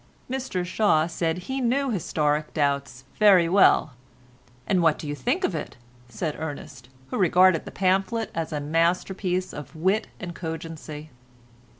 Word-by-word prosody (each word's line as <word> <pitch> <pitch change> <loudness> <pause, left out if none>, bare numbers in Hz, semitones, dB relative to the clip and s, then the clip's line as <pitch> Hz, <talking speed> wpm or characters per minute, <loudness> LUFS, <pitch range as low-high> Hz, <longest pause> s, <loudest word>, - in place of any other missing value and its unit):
Mr 255 -9 -3
Shaw 180 -4 +2
said 165 0 -2
he 265 0 -3
knew 260 +2 +1
"Historic 150 -6 -1
Doubts" 140 -3 -1 0.2
very 195 -5 +6
well. 175 -5 +4 0.7
"And 185 +5 +2
what 165 -2 +2
you 145 -1 -3
think 255 - -1
of 195 - +1
it?" 155 - -5 0.3
said 155 +4 -3
Ernest, 145 -5 -7 0.2
who - - -2
regarded 185 -2 +4
the - - -8
pamphlet 195 +4 0
as 165 -1 -3
a 150 - -2
masterpiece 180 +4 0
of 150 +2 -9
wit 190 +7 +1
and 175 -2 -6
cogency. 160 -2 -7
170 Hz, 140 wpm, -25 LUFS, 155-195 Hz, 0.7 s, very